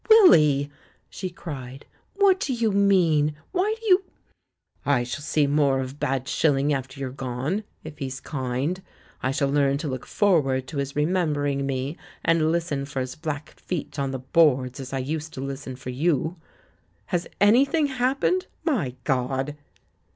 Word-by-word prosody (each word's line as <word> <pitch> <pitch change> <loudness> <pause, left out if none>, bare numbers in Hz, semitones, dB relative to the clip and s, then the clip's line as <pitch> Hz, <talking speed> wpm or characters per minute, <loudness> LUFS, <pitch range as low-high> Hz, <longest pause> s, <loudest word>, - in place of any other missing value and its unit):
"Willy!" 150 - +6 0.4
she 185 - -4
cried. 135 -6 -8 0.3
"What 395 -2 +4
do 285 -9 -1
you 230 -2 +1
mean? 175 -7 +3 0.2
Why 395 +4 +1
do 455 - -12
you 380 -2 +5 0.4
?" - - -46
"I 140 -4 +2
shall 120 +3 -5
see 150 0 +2
more 140 -2 +2
of 130 +2 -5
Bad 135 0 -1
Shilling 145 -1 +2
after 130 -1 -4
you're 135 -2 -3
gone 135 - -3
— - - -42
if 155 -1 -10
he's 130 -1 -4
kind. 135 +6 -2 0.4
I 130 - 0
shall 140 +1 0
learn 140 -1 +2
to 155 +2 -4
look 130 -2 -5
forward 145 -10 +2
to 155 - -6
his 140 0 -3
remembering 150 -4 0
me 135 +3 -2 0.3
and 160 -1 +3
listen 165 -5 -1
for 140 -1 -4
his 130 0 -3
black 150 -1 -5
feet 155 -4 -5
on 135 -1 0
the 135 - -3
boards, 130 -2 +2
as 130 -1 -7
I 135 - -2
used 150 +4 -4
to - - -6
listen 135 -1 -5
for 125 0 -7
you. 160 +4 0 0.8
Has 175 0 0
'anything 275 +9 +4
happened'? 275 +7 +1 0.2
My 185 - 0
God!" 135 +3 -1
145 Hz, 165 wpm, -25 LUFS, 135-175 Hz, 0.8 s, Willy